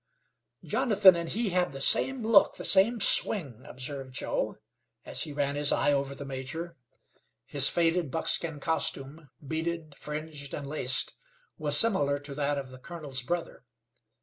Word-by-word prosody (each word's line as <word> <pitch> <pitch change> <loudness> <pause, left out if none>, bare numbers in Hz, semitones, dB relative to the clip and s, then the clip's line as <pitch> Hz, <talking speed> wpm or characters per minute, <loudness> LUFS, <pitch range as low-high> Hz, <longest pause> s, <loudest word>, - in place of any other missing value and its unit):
"Jonathan 200 -5 +4
and 170 -1 -4
he 225 +1 -1
have 180 -5 -1
the 135 - -7
same 255 - +3
look, 220 -3 +4
the - - -5
same 215 +5 +6
swing," 150 - +2
observed 130 0 -6
Joe, - - -3 0.5
as - - -1
he 150 - -8
ran 140 -1 -2
his 145 0 +2
eye 145 - +1
over 140 0 -2
the 140 +1 -9
major. 140 +6 -6 0.7
His - - +3
faded 170 -2 0
buckskin 160 0 -1
costume, 150 -1 -3 0.2
beaded, 160 0 -4
fringed, 150 -1 -6
and 145 - -7
laced, 135 -3 -1 0.5
was - - +1
similar 145 -11 +3
to 145 0 -7
that 145 0 -2
of 135 -2 -6
the 130 - -13
colonel's 145 -3 -4
brother. 170 +4 -5
150 Hz, 150 wpm, -28 LUFS, 140-170 Hz, 0.7 s, same